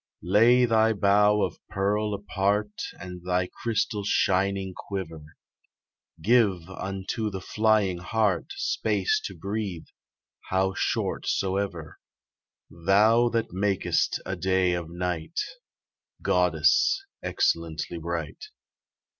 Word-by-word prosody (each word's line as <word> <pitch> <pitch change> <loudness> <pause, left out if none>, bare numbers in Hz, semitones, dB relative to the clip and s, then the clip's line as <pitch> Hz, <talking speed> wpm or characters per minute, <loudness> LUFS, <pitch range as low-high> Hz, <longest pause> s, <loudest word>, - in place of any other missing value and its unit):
Lay 115 +7 +5
thy 110 -1 +3
bow 105 +1 +3
of - - -3
pearl 105 +1 0
apart 100 +1 -1 0.2
And 90 -1 -9
thy 90 0 +1 0.2
crystal 110 -2 0
shining 95 -1 +1
quiver; 85 -6 -6 1.0
Give 100 -3 +2
unto 95 +3 -3
the 95 -2 -5
flying 105 -2 +1
hart 105 +2 0
Space 430 +2 0
to - - -6
breathe, 100 -5 -4 0.6
how 95 0 +1
short - - -1
soever: 95 -4 -2 0.7
Thou 105 +8 +4
that 115 -5 -2
mak'st 95 0 0
a 95 - -3
day 95 0 +1
of 85 -2 -3
night, 90 - -3 0.8
Goddess 380 +1 +3 0.2
excellently 85 0 -1
bright. 85 -2 -5
95 Hz, 100 wpm, -26 LUFS, 90-105 Hz, 1.0 s, Lay